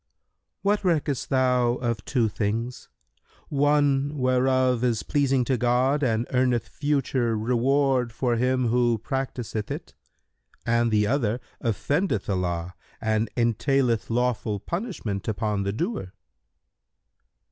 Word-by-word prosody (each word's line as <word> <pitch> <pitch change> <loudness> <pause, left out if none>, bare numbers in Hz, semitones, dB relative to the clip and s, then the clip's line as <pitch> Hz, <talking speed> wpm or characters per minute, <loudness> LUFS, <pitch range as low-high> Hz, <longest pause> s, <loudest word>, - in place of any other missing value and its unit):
Q - - -54 0.6
"What 205 +1 +1
reckest 150 -6 0
thou 125 -2 +2
of 120 -3 -2
two 120 -4 +1
things, 115 +4 -3 0.6
one 145 0 +2
whereof 130 -1 +2
is 120 -4 +1
pleasing 135 -3 +1
to 130 +1 +1
God 125 +4 +2
and 115 -3 +1
earneth 125 -2 +1
future 135 -6 0
reward 125 +2 +1
for 120 +1 0
him 125 0 +1
who 120 -1 +2
practiseth 120 -3 -4
it - - -6 0.7
and 115 0 +2
the 105 -1 +2
other 120 -2 0 0.2
offendeth 120 - 0
Allah 90 -2 -2 0.3
and 110 0 0
entaileth 120 0 +1
lawful 115 -3 0
punishment 165 - -4
upon 105 -2 -1
the 100 0 -1
doer?" 140 - -3
125 Hz, 115 wpm, -25 LUFS, 115-135 Hz, 0.7 s, thou